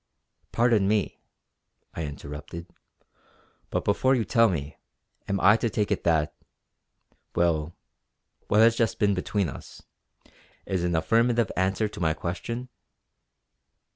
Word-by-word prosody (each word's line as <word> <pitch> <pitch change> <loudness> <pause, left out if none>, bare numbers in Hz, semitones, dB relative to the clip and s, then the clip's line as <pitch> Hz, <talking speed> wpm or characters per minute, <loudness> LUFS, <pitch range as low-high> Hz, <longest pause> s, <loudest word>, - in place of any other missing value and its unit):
"Pardon 115 -4 +3
me" 105 -1 0 0.7
I 80 - -4
interrupted 75 +3 -8 1.0
"but - - -2
before 130 +6 +3
you 115 -3 0
tell 115 -2 +4
me, 75 -4 -4 0.5
am 100 0 0
I 105 +4 +6
to 115 - -1
take 105 0 -1
it 100 - 0
that 80 -3 +2 1.0
well, 85 -1 +1 0.7
what 105 - +4
has 115 +1 +6
just 115 -2 0
been 100 -1 +2
between 95 +1 -1
us 70 - -10 0.8
is 95 -2 -1
an 90 -1 0
affirmative 115 +6 +2
answer 95 +4 +1
to 105 - -10
my 80 -3 +1
question?" 115 +10 -5
100 Hz, 125 wpm, -26 LUFS, 85-115 Hz, 1.0 s, I